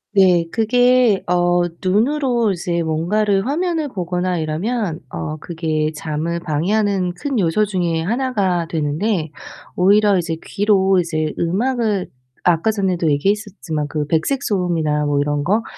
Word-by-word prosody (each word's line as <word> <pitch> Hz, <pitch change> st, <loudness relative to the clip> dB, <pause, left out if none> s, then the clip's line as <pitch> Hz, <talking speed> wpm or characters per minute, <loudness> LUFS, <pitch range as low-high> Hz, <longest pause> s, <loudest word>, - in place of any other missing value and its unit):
네 180 Hz, -3 st, +5 dB
그게 245 Hz, -1 st, +3 dB
어 175 Hz, 0 st, +2 dB, 0.2 s
눈으로 235 Hz, +3 st, +1 dB
이제 170 Hz, -1 st, -2 dB
뭔가를 195 Hz, +6 st, 0 dB
화면을 325 Hz, +1 st, -1 dB
보거나 180 Hz, -4 st, -2 dB
이러면 170 Hz, +3 st, -2 dB
어 155 Hz, 0 st, -5 dB
그게 155 Hz, -2 st, -2 dB
잠을 160 Hz, +3 st, -3 dB
방해하는 180 Hz, +3 st, 0 dB
큰 270 Hz, +4 st, -2 dB
요소 195 Hz, +4 st, +2 dB
중에 175 Hz, -5 st, -1 dB
하나가 200 Hz, -7 st, 0 dB
되는데 160 Hz, +2 st, -1 dB, 0.4 s
오히려 200 Hz, +1 st, +4 dB
이제 165 Hz, -2 st, -2 dB
귀로 195 Hz, -2 st, +2 dB
이제 155 Hz, -2 st, -1 dB
음악을 210 Hz, +2 st, 0 dB, 0.3 s
아까 175 Hz, +4 st, +2 dB
전에도 185 Hz, -6 st, 0 dB
얘기했었지만 180 Hz, -2 st, -1 dB
그 150 Hz, -1 st, -2 dB
백색 165 Hz, -, 0 dB
소음이나 165 Hz, -6 st, 0 dB
뭐 145 Hz, -1 st, +1 dB
이런 145 Hz, 0 st, 0 dB
거, 215 Hz, +5 st, +2 dB
180 Hz, 285 characters per minute, -19 LUFS, 160-210 Hz, 0.4 s, 네